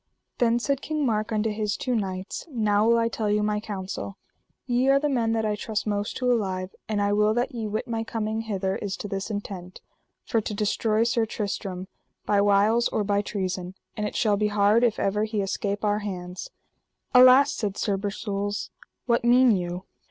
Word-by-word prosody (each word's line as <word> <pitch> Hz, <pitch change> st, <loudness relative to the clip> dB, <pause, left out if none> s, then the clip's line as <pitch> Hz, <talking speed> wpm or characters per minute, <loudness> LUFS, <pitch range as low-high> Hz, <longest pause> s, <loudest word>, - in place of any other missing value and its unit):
Then 235 Hz, -1 st, +3 dB
said 275 Hz, +2 st, -1 dB
King 305 Hz, -2 st, -1 dB
Mark 215 Hz, -2 st, 0 dB
unto 215 Hz, 0 st, 0 dB
his 210 Hz, -1 st, -2 dB
two 255 Hz, -, -2 dB
knights: 190 Hz, -, -3 dB
Now 215 Hz, -5 st, +2 dB
will 235 Hz, 0 st, +5 dB
I 230 Hz, 0 st, +2 dB
tell 220 Hz, -2 st, -2 dB
you 210 Hz, 0 st, +2 dB
my 210 Hz, 0 st, 0 dB
counsel: 195 Hz, -1 st, -6 dB, 0.5 s
ye 250 Hz, +1 st, +2 dB
are 275 Hz, -, +6 dB
the 295 Hz, -, 0 dB
men 235 Hz, -5 st, +1 dB
that 220 Hz, -1 st, 0 dB
I 210 Hz, -1 st, 0 dB
trust 210 Hz, 0 st, -3 dB
most 205 Hz, -1 st, -2 dB
to 250 Hz, -1 st, +1 dB
alive, 190 Hz, -5 st, -1 dB, 0.2 s
and 215 Hz, -1 st, 0 dB
I 205 Hz, 0 st, +2 dB
will 210 Hz, +1 st, +3 dB
that 240 Hz, +1 st, 0 dB
ye 225 Hz, -3 st, -3 dB
wit 215 Hz, +1 st, -3 dB
my 225 Hz, -1 st, -2 dB
coming 220 Hz, -1 st, -2 dB
hither 195 Hz, -4 st, -2 dB
is 200 Hz, -2 st, -4 dB
to -, -, -5 dB
this 195 Hz, +1 st, -4 dB
intent, 195 Hz, -4 st, -6 dB, 0.5 s
for 225 Hz, -, +1 dB
to 210 Hz, -, -4 dB
destroy 215 Hz, +1 st, +1 dB
Sir 230 Hz, -1 st, +1 dB
Tristram 195 Hz, -3 st, -4 dB, 0.4 s
by 205 Hz, -1 st, +3 dB
wiles 205 Hz, +4 st, +4 dB
or 215 Hz, -, -1 dB
by 200 Hz, 0 st, +1 dB
treason; 185 Hz, -3 st, -4 dB, 0.2 s
and 210 Hz, 0 st, -2 dB
it -, -, -7 dB
shall 210 Hz, -2 st, +2 dB
be 210 Hz, +1 st, +1 dB
hard 210 Hz, +2 st, +3 dB
if 235 Hz, -3 st, +2 dB
ever 210 Hz, +2 st, +1 dB
he 220 Hz, -1 st, -3 dB
escape 200 Hz, +1 st, -2 dB
our 205 Hz, 0 st, +2 dB
hands. 180 Hz, -3 st, -6 dB, 0.6 s
Alas, 255 Hz, +2 st, +7 dB
said 205 Hz, -3 st, -3 dB
Sir 205 Hz, -3 st, 0 dB
Bersules, 205 Hz, 0 st, -3 dB, 0.3 s
what 235 Hz, -2 st, +2 dB
mean 245 Hz, -1 st, +5 dB
you? 180 Hz, 0 st, -4 dB
210 Hz, 195 wpm, -26 LUFS, 200-230 Hz, 0.6 s, Alas